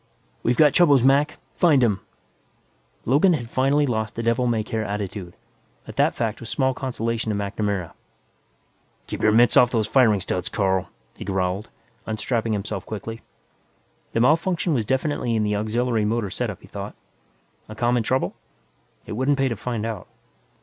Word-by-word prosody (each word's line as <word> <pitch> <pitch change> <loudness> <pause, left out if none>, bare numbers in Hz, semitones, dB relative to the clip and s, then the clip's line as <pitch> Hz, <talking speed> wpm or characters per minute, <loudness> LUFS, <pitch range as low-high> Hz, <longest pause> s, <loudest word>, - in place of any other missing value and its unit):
"We've 120 +1 +1
got 150 -3 +6
troubles, 145 -8 +5
Mac 140 +3 +3 0.2
find 150 -7 +4
'em!" 105 -5 +2 1.1
Logan 150 - +4
had 120 -6 -4
finally 140 +3 +2
lost 110 -4 -2
the 115 - -3
devil 115 +2 +1
may 115 -2 +1
care 110 +1 -3
attitude, 100 -3 -5 0.5
but - - -10
that - - +3
fact 110 -2 -2
was 115 - -7
small 130 -1 +1
consolation 115 -4 -3
to 105 - 0
MacNamara. 100 -3 -2 1.1
"Keep - - -6
your 110 - +4
mitts 120 +2 +5
off 125 - +6
those 115 -3 +1
firing 110 -3 +4
studs, 90 -1 -2
Carl," 95 -3 0 0.3
he - - -7
growled, 95 +1 -2 0.4
unstrapping 110 +1 -1
himself 100 -1 -3
quickly. 110 +2 -6 0.9
The - - +1
malfunction 165 +5 +2
was 115 -6 0
definitely 130 -3 0
in 110 - +1
the 105 0 0
auxiliary 110 +2 0
motor 105 -2 -1
setup, - - -3
he - - -15
thought. - - -7 0.7
A 110 - -8
common 120 +2 +1
trouble? 130 +4 0 0.7
It - - -9
wouldn't 130 +6 +1
pay 135 -1 +2
to 115 - -2
find 115 +1 -3
out. 110 -5 -5
115 Hz, 165 wpm, -23 LUFS, 105-130 Hz, 1.1 s, got